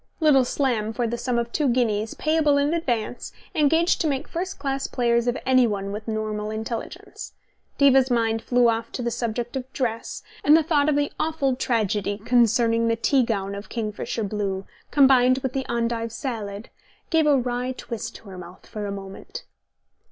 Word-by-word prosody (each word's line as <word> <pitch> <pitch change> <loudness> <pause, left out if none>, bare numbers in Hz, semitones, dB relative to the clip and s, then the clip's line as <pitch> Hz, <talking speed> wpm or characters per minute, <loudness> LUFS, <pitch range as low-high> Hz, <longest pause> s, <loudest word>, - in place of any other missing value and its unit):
Little 290 -5 +5
Slam, 235 -5 0
for 240 +1 -1
the 230 +1 -1
sum 240 0 -1
of 235 0 -1
two 295 +2 +1
guineas, 225 -3 0
payable 310 -2 +2
in 285 +2 +2
advance, 245 -8 -2 0.2
engaged 320 +4 +3
to 325 - +1
make 275 -3 -2
first 365 +3 -4
class 275 -1 -2
players 235 -1 +1
of 245 +2 +1
anyone 225 -7 +2
with 210 +2 -6
normal 215 -1 -2
intelligence. 220 +2 -6 0.4
Diva's 270 -2 +5
mind 225 -2 +1
flew 245 0 +3
off 230 0 0
to 250 - -3
the 235 - -1
subject 235 +1 -3
of 260 0 -5
dress, 230 -3 -3 0.2
and 300 +2 +7
the 325 - +2
thought 300 -2 +2
of 300 - +2
the 290 0 0
awful 295 -5 0
tragedy 210 -5 0
concerning 230 0 +3
the 230 - +2
tea 260 +4 +2
gown 200 -5 -1
of 200 +1 -8
kingfisher 220 0 -3
blue, 195 -2 -2 0.2
combined 260 -2 +5
with 260 -1 -2
the 265 -1 -2
endive 230 -1 -1
salad, 215 -4 -5 0.4
gave 320 -2 +3
a 290 -2 +5
wry 250 0 -1
twist 230 -3 -6
to 205 - -12
her 185 -1 -9
mouth 175 0 -12
for 210 -1 -5
a - - -4
moment. 195 -1 -8
235 Hz, 180 wpm, -24 LUFS, 220-270 Hz, 0.4 s, and